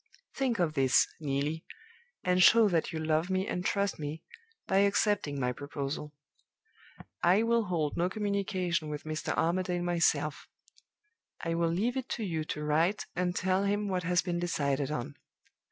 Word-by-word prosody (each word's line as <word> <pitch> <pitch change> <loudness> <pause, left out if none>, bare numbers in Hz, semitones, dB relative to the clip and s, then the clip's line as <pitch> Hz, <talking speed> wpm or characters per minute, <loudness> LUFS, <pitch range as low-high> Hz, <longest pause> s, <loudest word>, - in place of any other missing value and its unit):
Think 260 -4 0
of 170 -4 +1
this, 130 -3 +4
Neelie, 145 +2 -2 0.6
and 180 0 +2
show 225 +3 +7
that 165 -3 0
you 160 - -4
love 160 +2 0
me 190 0 0
and 180 -3 -3
trust 200 -1 0
me, 150 +1 -5 0.4
by 190 - +1
accepting 200 -7 +2
my 125 -1 0
proposal. 145 +2 -5 1.1
I 185 +6 +4
will 230 -1 +2
hold 165 -6 -1
no 175 +2 +1
communication 190 -5 -1
with 150 0 -5
Mr. 155 0 -3
Armadale 175 +1 0
myself. 175 -1 +1 0.9
I 165 - -1
will 165 0 +1
leave 220 +10 0
it 260 - -4
to 230 - -4
you 165 -5 -2
to 150 -1 -4
write 160 +7 +1
and 180 0 0
tell 190 +1 +1
him 205 +1 0
what 185 -1 0
has 180 +1 +1
been 175 -2 -2
decided 140 -5 0
on. 120 - -4
175 Hz, 160 wpm, -30 LUFS, 155-195 Hz, 1.1 s, show